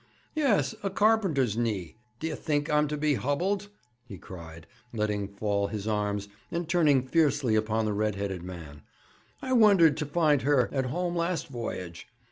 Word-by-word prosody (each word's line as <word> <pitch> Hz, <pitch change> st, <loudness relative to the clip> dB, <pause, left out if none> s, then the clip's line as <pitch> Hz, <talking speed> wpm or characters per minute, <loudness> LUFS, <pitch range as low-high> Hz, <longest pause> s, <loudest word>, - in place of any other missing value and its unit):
'Yes; 280 Hz, -9 st, +2 dB
a 195 Hz, -, -1 dB
carpenter's 190 Hz, -, +2 dB
knee. 110 Hz, -7 st, -2 dB, 0.2 s
D'ye 160 Hz, 0 st, -3 dB
think 145 Hz, -1 st, -1 dB
I'm 150 Hz, 0 st, +3 dB
to 150 Hz, +1 st, -3 dB
be 150 Hz, 0 st, +2 dB
hubbled?' 180 Hz, +10 st, -1 dB, 0.4 s
he 110 Hz, -6 st, -10 dB
cried, 85 Hz, -3 st, -11 dB, 0.3 s
letting 105 Hz, -3 st, -1 dB
fall 100 Hz, 0 st, -1 dB
his 105 Hz, -1 st, -5 dB
arms, 105 Hz, -1 st, -1 dB, 0.2 s
and 170 Hz, -1 st, -3 dB
turning 155 Hz, -6 st, +3 dB
fiercely 140 Hz, -4 st, +2 dB
upon 110 Hz, +1 st, +1 dB
the 105 Hz, -, 0 dB
red 105 Hz, 0 st, 0 dB
headed 100 Hz, -2 st, -3 dB
man. 85 Hz, -5 st, -9 dB, 0.6 s
'I 260 Hz, -, -1 dB
wondered 195 Hz, -, +6 dB
to 150 Hz, -2 st, -3 dB
find 150 Hz, -3 st, +2 dB
her 135 Hz, -3 st, +2 dB
at 135 Hz, -2 st, 0 dB
home 175 Hz, +5 st, -2 dB
last 170 Hz, -1 st, -1 dB
voyage. 90 Hz, -9 st, -6 dB
130 Hz, 160 wpm, -28 LUFS, 105-165 Hz, 0.6 s, wondered